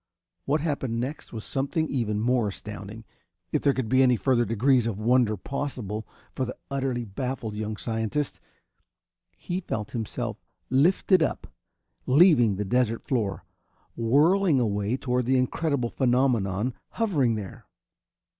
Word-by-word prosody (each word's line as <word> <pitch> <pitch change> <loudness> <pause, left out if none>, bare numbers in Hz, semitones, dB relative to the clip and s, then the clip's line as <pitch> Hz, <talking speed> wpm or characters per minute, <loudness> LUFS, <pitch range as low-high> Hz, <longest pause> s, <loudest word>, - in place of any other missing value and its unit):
What 150 +2 +1
happened 135 -7 -2
next 130 +5 -5
was 110 -2 -6
something 145 +4 -1
even 110 -7 -1
more 120 0 +2
astounding, 105 +2 -8 0.5
if - - +1
there 140 - +4
could 130 -4 -2
be 130 +3 +4
any 125 -2 +5
further 120 +2 +2
degrees 120 +2 +2
of 110 -4 -2
wonder 115 -1 +2
possible 115 -3 -4 0.3
for 130 - -2
the 130 - -5
utterly 130 -3 -1
baffled 120 +1 -4
young 105 0 -4
scientist. 115 +6 -2 1.0
He 175 - -3
felt 105 - -4
himself 115 -1 -4 0.3
lifted 175 +6 +4
up, - - -1 0.6
leaving 130 - +5
the 105 +2 -3
desert 115 +1 +1
floor, 110 -7 -2 0.5
whirling 150 +7 +3
away 105 +1 0
toward 125 -2 -1
that 130 - +3
incredible 130 -1 0
phenomenon 120 -4 +1 0.2
hovering 150 - +1
there. 100 -3 -8
125 Hz, 135 wpm, -26 LUFS, 110-135 Hz, 1.0 s, any